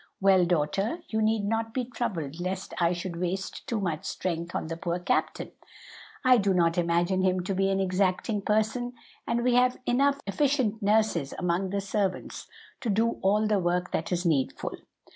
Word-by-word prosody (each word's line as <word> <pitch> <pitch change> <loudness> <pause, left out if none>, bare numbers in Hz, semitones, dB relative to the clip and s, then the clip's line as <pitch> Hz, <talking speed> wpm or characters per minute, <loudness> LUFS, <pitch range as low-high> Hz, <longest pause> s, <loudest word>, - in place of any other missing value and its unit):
Well, 190 -2 +5
daughter, 195 - 0
you 220 0 0
need 215 -1 +1
not 225 +1 -1
be 255 -2 0
troubled 175 - -4
lest 185 +1 -4
I 170 -1 +3
should 175 0 -4
waste 190 +2 -3
too 230 - -1
much 170 -6 -2
strength 170 -1 -3
on - - -1
the 165 +1 -4
poor 170 +1 -2
captain. 180 +1 -1 0.7
I 255 -1 +7
do 195 -2 +2
not 170 -2 +3
imagine 175 +2 +1
him 185 -1 +2
to 195 - -2
be 195 +1 +1
an 195 0 +1
exacting 190 +3 0
person, 220 +4 0 0.3
and 235 0 0
we 250 0 +3
have 250 0 +3
enough 275 +3 +2
efficient 245 -1 +1
nurses 205 -8 +1
among 180 +2 0
the 200 +1 -1
servants 195 -1 -2 0.3
to 245 - -3
do 225 +3 +1
all 210 +3 +3
the 210 -2 +2
work 180 0 0
that 160 - -2
is 175 0 -1
needful. 145 -6 0
195 Hz, 180 wpm, -27 LUFS, 175-220 Hz, 0.7 s, I